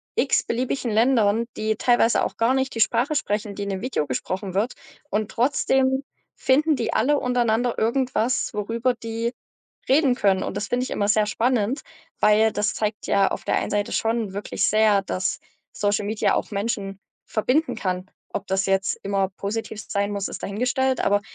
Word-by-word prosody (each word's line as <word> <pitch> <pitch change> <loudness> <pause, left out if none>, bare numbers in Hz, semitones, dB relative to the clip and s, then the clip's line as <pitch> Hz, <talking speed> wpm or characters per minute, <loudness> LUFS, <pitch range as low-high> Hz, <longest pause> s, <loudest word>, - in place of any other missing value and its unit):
x-beliebigen 245 0 0
Ländern, 225 -1 +3
die 215 0 0
teilweise 240 -1 +3
auch - - -5
gar 230 +3 +3
nicht 265 0 0
die - - -3
Sprache 275 +7 +2
sprechen, 210 -6 -1
die 205 - -4
in 200 - -4
dem 190 0 -3
Video 255 - -1
gesprochen 185 +8 -3
wird. 215 +6 0 0.4
Und 215 0 -1
trotzdem 265 +1 +2 0.3
finden 300 +3 +3
die 235 -3 -2
alle 285 +5 +2
untereinander 245 -1 +1
irgendwas, 250 +1 0
worüber 230 +4 0
die 230 +1 -3 0.6
reden 275 -2 +4
können. 195 -4 +2
Und - - -4
das 205 - -3
finde 250 +1 0
ich - - -7
immer 205 - 0
sehr 210 0 +3
spannend, 240 +3 0 0.4
weil 215 +1 +4
das 210 0 0
zeigt 210 -1 -3
ja 200 -1 +3
auf - - -4
der - - +1
einen - - -2
Seite 205 0 0
schon 225 -3 -1
wirklich 205 - -1
sehr, 215 -2 +4
dass 185 +5 -2 0.3
Social 205 0 0
Media 215 +1 +1
auch - - -2
Menschen 200 -2 -3 0.3
verbinden 260 +8 0
kann. 185 0 -3 0.2
Ob 200 - -3
das 190 0 +1
jetzt 195 -1 0
immer 195 -1 0
positiv 215 +1 -4
sein 200 0 -1
muss, 200 -1 -2
ist - - -8
dahingestellt, 255 +5 0
aber 205 0 +2
220 Hz, 175 wpm, -24 LUFS, 200-250 Hz, 0.6 s, reden